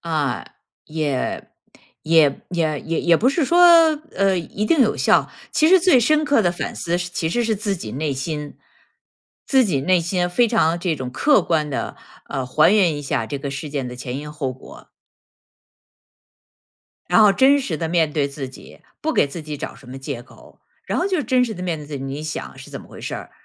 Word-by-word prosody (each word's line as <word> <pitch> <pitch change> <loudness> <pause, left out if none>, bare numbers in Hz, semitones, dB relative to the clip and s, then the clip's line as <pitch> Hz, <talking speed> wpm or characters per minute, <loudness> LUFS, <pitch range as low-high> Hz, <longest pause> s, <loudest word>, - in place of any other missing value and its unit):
啊， 150 -6 -2 0.4
也 150 -4 -3 0.5
也 155 -3 +3
也 160 -4 -1
也 165 0 -2
也 170 -1 +4
不 250 - +2
是 285 +2 +1
说 345 +6 +2 0.6
呃， 195 -2 +2
一 195 +5 -4
定 320 +1 +3
有 230 - +3
效。 - - +2 0.2
其 310 - +3
实 375 -1 +6
最 340 -8 +5
深 305 +5 +2
刻 285 -6 +3
的 175 -1 +1
反 - - -5
思 175 +1 -2
是 175 0 -4
其 160 -2 -2
实 240 +8 0
是 220 -2 0
自 200 -1 -2
己 110 -10 -7
内 145 +2 -2
心。 150 +2 -5 0.9
自 265 -2 +4
己 140 -8 -1
内 180 +3 +3
心 175 +1 -1
非 235 +5 +3
常 170 -7 +2
这 170 -3 -1
种 130 -2 -5
客 280 - +3
观 155 -3 0
地， 135 - -4 0.3
呃， 130 -2 -3
还 155 +9 +4
原 175 -8 +3
一 145 - -6
下 140 -5 -2
这 140 - -4
个 140 0 -5
事 145 +2 -6
件 140 -3 -3
的 125 - -7
前 125 0 -6
因 150 +1 -7
后 145 -3 -3
果。 130 - -15 2.2
然 225 - +5
后 205 -2 +6
真 270 +7 +4
实 180 -11 -3
地 165 +1 -3
面 160 -3 +1
对 145 -3 +1
自 140 -2 -6
己， 130 - -15 0.2
不 315 +1 -1
给 - - +3
自 155 +3 -8
己 150 -1 -6
找 - - -6
什 135 - -17
么 130 +1 -8
借 135 -3 -6
口。 - - -19 0.3
然 - - -1
后 365 - +1
就 370 -6 0
真 255 -1 +2
实 225 -3 -5
地 180 - -7
面 170 -4 -2
对 150 - -10
自 145 -1 -6
己， - - -7
你 140 +3 -5
想 155 0 -6
是 - - -12
怎 - - -7
么 - - -16
回 - - -12
事 - - -5
儿。 - - -8
165 Hz, 235 characters per minute, -21 LUFS, 145-210 Hz, 2.2 s, 实